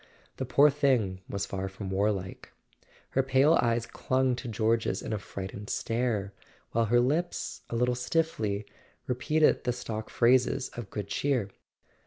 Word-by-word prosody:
The 130 - -3
poor 145 +3 +6
thing 125 -10 +1
was 100 -1 -2
far 95 0 -4
from 95 0 -6
warlike: 95 -1 -1 0.6
her 135 - +3
pale 135 +4 +4
eyes 115 -1 +1
clung 130 0 0
to 125 - -6
George's 115 +1 +1
in - - -3
a 105 - -1
frightened 100 +1 -7
stare, 115 -4 -1 0.4
while 115 0 +2
her 120 +3 +4
lips, 155 +8 -1
a - - -3
little 125 +1 +2
stiffly, 125 -6 -1 0.4
repeated 150 +5 +2
the 125 - +1
stock 110 -3 -5
phrases 125 +2 +3
of 120 -5 -8
good 105 -2 -5
cheer. 125 -3 0
120 Hz, 150 wpm, -29 LUFS, 105-130 Hz, 0.6 s, poor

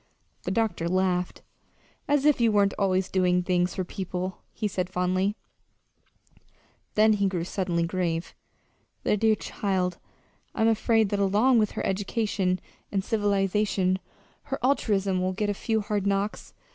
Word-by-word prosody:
The - - -1
doctor 190 -5 0
laughed. 180 -1 0 0.6
"As 290 -1 +2
if 295 -5 +4
you 230 -1 +4
weren't 200 -1 +3
always 190 -1 +2
doing 180 -1 +2
things 180 0 +1
for 185 - -1
people," 185 0 -4
he 215 - -2
said 185 -2 -2
fondly. 185 +2 0 1.6
Then 215 +1 +5
he 200 -1 +2
grew 180 -3 -2
suddenly 175 -2 -1
grave. 170 -1 -2 0.7
"The - - +2
dear 220 +1 +3
child! 185 -4 -2 0.6
I'm 220 - +2
afraid 225 -1 +3
that 205 - -1
along 210 +6 +4
with 215 -1 +1
her - - -3
education 195 -2 0 0.3
and 195 -1 0
civilization 200 -2 +1 0.5
her 270 - -3
altruism 200 -8 +1
will 185 0 0
get 205 +2 -1
a - - -1
few 220 +2 -1
hard 205 -1 -1
knocks. 200 +1 -2
195 Hz, 145 wpm, -26 LUFS, 185-210 Hz, 1.6 s, Then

